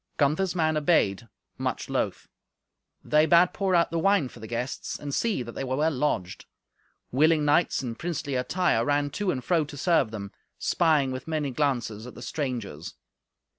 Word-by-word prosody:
Gunther's 160 +6 +1
men 155 -2 +1
obeyed, 120 - +2 0.3
much - - -2
loth. - - -2 0.8
They 155 +1 +3
bade 175 +1 +5
pour 195 -2 +1
out 170 -2 +3
the 165 - 0
wine 195 -6 +2
for - - -14
the 110 - -8
guests, 120 +3 -4
and 145 -1 -6
see 215 - 0
that 115 - -8
they 135 - -5
were 130 0 -2
well 155 +3 +2
lodged. 125 - -2 0.6
Willing 155 +3 +3
knights 145 0 +2
in 120 -2 -3
princely 155 0 -4
attire 125 -1 +1
ran 145 +2 +1
to 205 +5 -2
and 130 -7 -1
fro 170 -3 +2
to 145 0 -10
serve 160 -6 +2
them, 100 -3 -7 0.3
spying 155 -6 +2
with 130 +3 -6
many 155 -3 -1
glances 120 -6 -1
at 125 - -11
the 120 - -9
strangers. 120 - -4
145 Hz, 175 wpm, -26 LUFS, 125-165 Hz, 0.8 s, bade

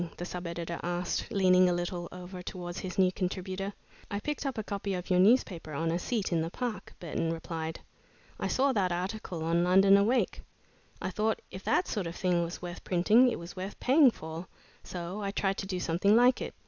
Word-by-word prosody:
the 175 - -4
sub 180 0 -5
editor 170 0 -4
asked, 175 +1 -2
leaning 185 -2 +5
a - - +2
little 175 0 -3
over 180 0 -8
towards 175 0 -6
his 180 -2 -6
new 185 -1 +4
contributor. 185 +1 -3 0.4
"I 200 - -2
picked 295 +4 -3
up 270 - -3
a 220 - -2
copy 200 -2 -3
of 180 +1 -5
your 180 - +4
newspaper 185 -7 +3
on 165 +3 0
a 170 - 0
seat 215 +1 -2
in 165 -2 +2
the 165 - -2
Park," 240 +3 -5
Burton 165 -1 -2
replied. 165 0 -4 0.6
"I - - -1
saw 275 +1 +2
that 190 -5 +1
article 180 -1 -3
on 170 +1 +2
'London 195 +2 +6
Awake.' 225 +6 +2 0.6
I 190 - -3
thought 215 +3 0
if 185 - -8
that 365 - +2
sort 200 -6 -2
of 170 - -6
thing 180 -2 +1
was 170 +1 -6
worth 175 0 -6
printing, 215 +8 +5
it - - -2
was 170 +2 -9
worth 190 +2 -6
paying 270 +1 +6
for, 160 -4 -7 0.4
so 180 +3 -5
I 200 - -1
tried 195 -1 0
to 195 - -4
do 185 -2 -2
something 180 +5 +3
like 245 +2 +5
it. - - -5
185 Hz, 210 wpm, -30 LUFS, 175-200 Hz, 0.6 s, London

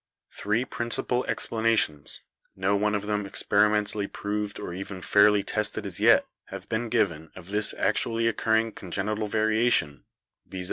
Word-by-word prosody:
"Three 110 +5 -1
principal 120 +1 -1
explanations, 110 -10 0 0.3
no 95 +1 +1
one 105 +1 +1
of 105 0 -3
them 105 0 -1
experi 105 +2 +2
mentally 105 -1 -1
proved 105 0 -4
or - - -6
even 95 +1 -6
fairly 105 +2 +4
tested 105 0 -2
as - - -4
yet, - - +5 0.2
have - - -9
been 115 +1 -2
given 85 -9 0
of 95 0 -12
this 105 +1 +2
actually 115 0 0
occurring 110 0 +1
congenital 105 +3 -3
variation, 110 - +1 0.4
viz. 95 - -7
105 Hz, 145 wpm, -26 LUFS, 100-110 Hz, 0.4 s, yet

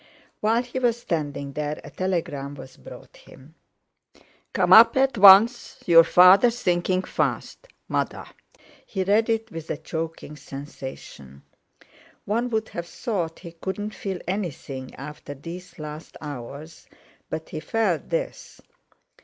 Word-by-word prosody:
While 225 +3 +2
he 250 +1 -5
was 240 -2 +1
standing 145 -8 -3
there, 150 +1 -3
a 145 - -11
telegram 150 -7 -3
was 130 -1 -12
brought - - -13
him. 140 +4 -17 1.0
"Come - - +3
up - - +8
at 265 -1 +3
once, 205 +5 +7
your 165 -1 +8
father 185 +7 +7
sinking 185 -5 0
fast.—MOTHER." - - -3 0.6
He 190 -2 -3
read 210 +4 +2
it 225 0 -1
with 165 -3 -8
a - - -2
choking 160 -1 -6
sensation. 130 - -10 0.8
One 235 +4 -1
would 220 -2 -2
have 170 -1 -6
thought 175 -7 -3
he 170 -2 -9
couldn't 190 +5 -5
feel 195 -2 -4
anything 145 -9 -5
after 145 +1 -9
these 170 +6 -10
last 155 0 -9
hours, 145 +2 -9 0.4
but 160 0 -5
he 155 - -5
felt 200 -1 -1
this. - - -4
175 Hz, 130 wpm, -24 LUFS, 150-215 Hz, 1.0 s, up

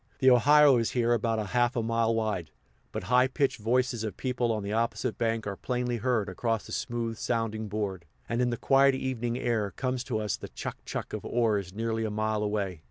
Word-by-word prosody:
The 130 0 +5
Ohio 145 +2 +6
is 115 -1 +1
here 120 0 +3
about 115 -2 0
half 120 +3 +2
a 120 - 0
mile 115 0 +1
wide, 105 -8 -1 0.4
but - - -4
high 125 +1 +4
pitched 135 -1 0
voices 120 +1 +1
of 105 -4 -4
people 125 -2 0
on 110 -2 -2
the 100 +1 -3
opposite 115 +1 -1
bank 115 -1 0
are 105 -1 -3
plainly 125 +2 -2
heard 115 -3 0
across 115 +4 -2
the - - -11
smooth 115 -1 -3
sounding 110 -2 -1
board; 100 -4 -3 0.2
and 120 +1 0
in 125 - +2
the 120 - -2
quiet 135 +1 +4
evening 120 -3 -2
air 115 -5 0
comes 130 -1 -2
to 125 -5 -1
us 105 -2 -1
the - - -8
"chuck - - -7
chuck" - - -5
of - - -4
oars 105 -6 0
nearly 115 +2 -2
a 110 - -1
mile 110 0 -1
away. 100 -5 -2
115 Hz, 210 wpm, -28 LUFS, 110-125 Hz, 0.4 s, Ohio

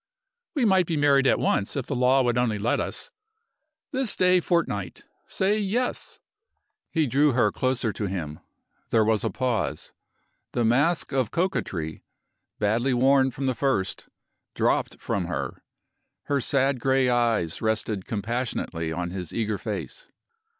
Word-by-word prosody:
"We 270 -5 +2
might 190 -4 +4
be 165 - -1
married 140 -2 +4
at - - +4
once 100 - 0
if 135 -4 -2
the 140 - -2
law 130 +2 +4
would 120 -1 +1
only 120 -3 +1
let 110 +4 0
us. - - -4 0.8
This 260 -4 +1
day 180 0 +4
fortnight! 165 - -1 0.2
Say 200 +3 +1
Yes!" 220 +5 -2 0.7
He 160 -2 +1
drew 140 +2 +3
her 115 -4 +3
closer 125 -3 -1
to 105 0 -3
him. 80 -6 -4 0.5
There 110 -2 +3
was 110 -1 +1
a - - +1
pause. 125 -5 -2 0.6
The 120 - +1
mask 145 +10 +2
of 130 -5 0
coquetry 90 - -2 0.5
badly 115 +5 +1
worn 135 +1 +4
from 135 +2 -5
the 130 - +1
first 130 -7 -1 0.5
dropped - - 0
from - - -2
her. - - -4 0.6
Her 140 -2 0
sad 135 +1 +1
gray 130 +1 +2
eyes 115 -9 +1
rested 110 -3 -1
compassionately 110 -7 -3
on 85 +1 -3
his 90 -3 -5
eager 110 -3 -2
face. - - -5
125 Hz, 145 wpm, -25 LUFS, 105-140 Hz, 0.8 s, might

